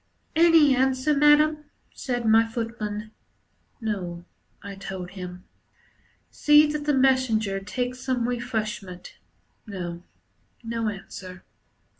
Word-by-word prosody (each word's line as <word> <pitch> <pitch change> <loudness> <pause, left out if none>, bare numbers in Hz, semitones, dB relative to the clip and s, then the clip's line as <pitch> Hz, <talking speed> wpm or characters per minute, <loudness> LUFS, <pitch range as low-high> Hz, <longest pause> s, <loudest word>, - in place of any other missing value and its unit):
"Any 325 -4 +6
answer, 265 +3 +2
Madam," 300 +1 +4 0.3
said 245 -3 -3
my 225 +1 +5
footman. 215 -2 -5 0.7
"No," 180 -6 -4 0.4
I 200 - -7
told 190 -2 -7
him. 180 -1 -8 0.9
"See 295 0 +5
that 295 0 -3
the 295 - +2
messenger 255 -7 +2
takes 250 +5 -4
some 250 -2 -1
refreshment. 215 -7 -4 0.5
No, 175 -4 -6 0.6
no 230 -1 -2
answer." 185 -2 -9
230 Hz, 100 wpm, -25 LUFS, 195-265 Hz, 0.9 s, Any